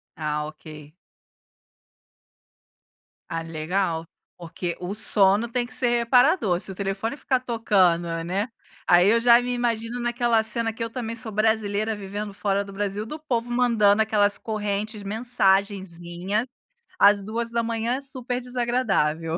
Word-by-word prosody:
Ah, 150 -1 -2
ok. 155 -1 -12 2.4
Ah, 165 0 -3
legal, 165 +1 -2 0.3
porque 170 0 -5
o 180 +2 -4
sono 210 +1 +3
tem 245 0 0
que - - -9
ser 250 -1 +2
reparador, 240 - +3
se 195 - +1
o - - -8
telefone 200 +7 -3
ficar 260 -2 0
tocando, 195 -8 +2 0.2
né, 195 +6 -2 0.4
aí 180 +3 +6
eu 230 +1 +4
já 235 0 +6
me 245 0 -2
imagino 235 0 -2
naquela 240 -1 +1
cena 225 +1 -1
que 225 - -12
eu 230 - -1
também 230 -1 -5
sou 225 -1 -3
brasileira 215 0 0
vivendo 205 0 -6
fora 200 0 -1
do 195 - -11
Brasil 205 +1 -3
do 305 +7 -7
povo 240 -5 -2
mandando 220 -4 +3
aquelas 205 -2 +2
correntes, 210 -1 -3
mensagenzinhas, 195 -2 -1 0.5
às 200 0 +5
2h00, 230 +3 -2
super 255 -2 -3
desagradável. 220 -11 0
215 Hz, 135 wpm, -24 LUFS, 195-235 Hz, 2.4 s, aí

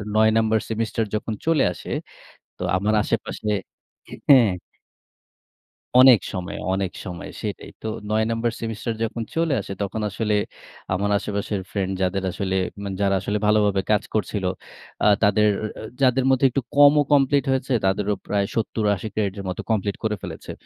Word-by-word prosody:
৯ 110 0 +5
number 110 0 +3
semester 115 0 -1
যখন 110 +1 -2
চলে 165 -3 +3
আসে - - -9 0.7
তো - - -7
আমার 105 +3 +1
আশেপাশে 110 -1 -3 0.6
হে - - -10
হ্যাঁ 125 -7 +7 1.5
অনেক 130 -5 +8
সময়, 95 +2 -4 0.2
অনেক 95 -1 -1
সময় 90 -2 -6
সেটাই। - - -5
তো 110 - -5 0.2
৯ 110 +1 +2
নাম্বার 115 0 0
সেমিস্টার 115 0 -3
যখন 115 +1 -2
চলে 165 -3 +1
আসে 100 - -6
তখন 105 +2 -3
আসলে 105 +1 -1 0.6
আমার 100 +3 0
আশেপাশের 100 0 -3
ফ্রেন্ড 95 -2 -1
যাদের 95 +1 0
আসলে, 95 0 -2 0.2
উ - - -9
মানে 100 -1 -4
যারা 100 -1 +3
আসলে 105 +2 -1
ভালোভাবে 105 -2 +3
কাজ 105 - +3
করছিল 105 -2 -1 0.6
আ - - +6 0.2
তাদের, 105 +1 +4 0.3
আ - - -7 0.2
যাদের 130 0 +4
মধ্যে 130 +1 +3
একটু 135 +2 -1
কমও 145 +1 +7
কমপ্লিট 140 0 +4
হয়েছে 130 0 0
তাদেরও 100 +2 +1
প্রায় 100 -1 +1
৭০-৮০ 110 -2 0
ক্রেডিটের 100 -2 -2
মতো 90 - -4
কমপ্লিট 100 -2 0
করে 110 -1 0
ফেলেছে। - - -7
105 Hz, 155 wpm, -23 LUFS, 100-115 Hz, 1.5 s, অনেক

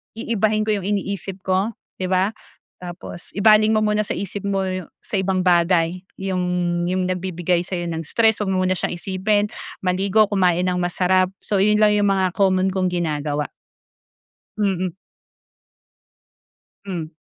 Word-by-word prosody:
iibahin 215 -2 0
ko 215 - +2
yung 190 - -5
iniisip 195 -2 -3
ko 190 +4 0 0.3
'di 185 - -1
ba? 190 +3 +2 0.5
Tapos 175 -1 -9
ibaling 215 +1 +5
mo 215 - +3
muna 210 0 +2
sa - - -2
isip 200 0 -5
mo 195 -1 0 0.4
sa - - -4
ibang 190 -1 0
bagay 175 0 +3 0.2
yung 190 -1 -1 0.4
yung 185 0 0
nagbibigay 180 -1 -1
sa'yo 175 -2 -3
ng 165 0 -3
stress 225 -2 +3
huwag 205 - -1
mo 185 0 +1
muna 185 0 +1
siyang - - -2
isipin, 200 +3 0 0.4
maligo, 195 +4 +3
kumain 180 -3 +2
ng 180 0 0
masarap. 185 +1 +2 0.2
So 200 -2 0
yun 210 +2 +3
lang 210 - +6
yung 205 0 +2
mga 190 -2 +1
common 190 -1 +3
kong 185 -1 +1
ginagawa. 150 -4 -2 1.1
Mm. 185 -4 0 1.9
Mm. 170 -5 -5
185 Hz, 145 wpm, -21 LUFS, 180-205 Hz, 1.9 s, lang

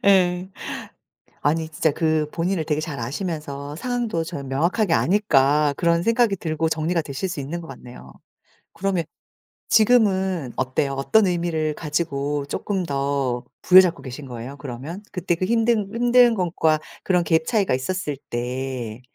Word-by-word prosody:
예. 185 -2 +3 0.9
아니 160 +2 0
진짜 155 0 +1
그 155 -1 0
본인을 170 -1 -1
되게 150 -1 0
잘 150 -5 -5
아시면서 145 +1 -4
상황도 240 -4 -2
저는 145 -5 -6
명확하게 170 +7 +1
아니까 150 -7 +3
그런 170 0 +2
생각이 230 -2 +3
들고 160 -1 -1
정리가 165 +2 0
되실 145 +4 -4
수 170 - -4
있는 160 +5 -4
것 165 - -10
같네요. 125 - -11 0.6
그러면 185 -2 -1 0.7
지금은 190 - +3
어때요? 130 +2 0
어떤 190 +10 +3
의미를 170 -3 0
가지고 145 -2 -2
쪼끔 195 +2 -2
더 135 -3 -1 0.2
부여잡고 180 -4 +6
계신 135 +2 -8
거예요 125 +2 -7
그러면? 145 +7 -7
그때 180 -2 0
그 185 - -1
힘든 225 -2 +2
힘든 240 0 +5
것과 160 -4 +1 0.2
그런 180 -2 +2
갭 160 0 +2
차이가 205 - +1
있었을 145 +1 -3
때 125 -1 -4
160 Hz, 305 characters per minute, -23 LUFS, 140-185 Hz, 0.9 s, 부여잡고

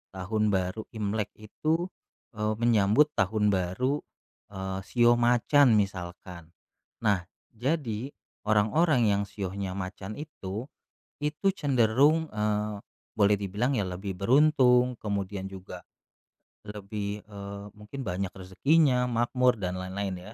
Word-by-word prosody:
Tahun 105 +4 -1
Baru 95 +2 -1
Imlek 105 -1 -2
itu, 155 - -1 0.5
eee, 105 0 -1
menyambut 115 +5 +4
Tahun 105 +1 +2
Baru, 100 +11 0 0.5
eee, 95 -1 -4
shio 120 -1 +4
macan, 120 +1 +4
misalkan. 90 -3 -4 0.5
Nah, 95 -4 +1 0.3
jadi 125 -1 -2 0.4
orang-orang 120 +5 +3
yang 100 0 +2
shionya 95 -1 -4
macan 95 +2 -6
itu, 120 -7 -6 0.6
itu 150 +6 -1
cenderung, 140 +4 +3
eee, 105 0 -1 0.4
boleh 105 0 +5
dibilang 105 +7 -1
ya 100 - +1
lebih 95 +1 -5
beruntung, 125 +1 +4
kemudian 100 -2 -3
juga 90 -2 -9 0.8
lebih, 105 0 -5
eee, 100 0 -8
mungkin 105 +6 -8
banyak 90 +1 -2
rezekinya, 125 - +2
makmur, 120 0 +2
dan 90 -1 -2
lain-lain 95 +1 -3 0.2
ya. - - -13
105 Hz, 110 wpm, -28 LUFS, 95-125 Hz, 0.8 s, boleh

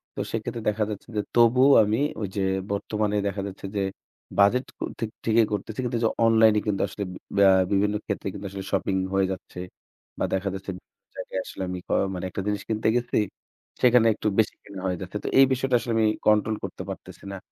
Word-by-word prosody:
তো - - -6
সেক্ষেত্রে 115 +1 -3
দেখা 105 +1 0
যাচ্ছে 105 - -6
যে, - - +3
তবুও 125 +4 +6
আমি 105 +4 0 0.2
ঐযে 100 0 -3 0.3
বর্তমানে 105 +1 -1
দেখা 100 0 -2
যাচ্ছে 100 0 -9
যে 100 - +1 0.6
বাজেট 120 +6 +5 0.4
ঠি 115 - 0 0.2
ঠিকই 115 0 +4
করতেছি। 110 +3 -4
কিন্তু 120 -1 -1 0.3
অনলাইনে 110 -1 +5
কিন্তু 100 -2 0
আসলে 100 - -5 0.3
বা 100 - +6 0.3
বিভিন্ন 105 +1 +2
ক্ষেত্রে 100 -1 -3
কিন্তু 100 - -8
আসলে 95 0 -6
শপিং 95 - 0 0.2
হয়ে 95 0 +3
যাচ্ছে 90 -1 -7 0.6
বা, - - 0
দেখা 95 +1 0
যাচ্ছে 95 0 -7
বিভিন্ন - - -25
জায়গায় 95 - -4
আসলে - - -8
আমি 90 0 -4
ক - - -42 0.2
মানে 90 0 -4
একটা 95 - -4
জিনিস 105 -1 -1
কিনতে 110 0 0
গেছি, 120 0 0 0.6
সেখানে 125 -2 +6
একটু 105 - -3
বেশি 110 - +2
কেনা 100 -2 -9
হয়ে 90 -1 -1
যাচ্ছে। 95 +3 -5
তো - - -4
এই 135 - +9
বিষয়টা 130 -1 +1
আসলে 115 +1 -4
আমি 110 - +4 0.2
কন্ট্রোল 105 +1 +4
করতে - - -6
পারতেছি - - -9
না। 95 - -5
105 Hz, 190 wpm, -25 LUFS, 100-115 Hz, 0.6 s, এই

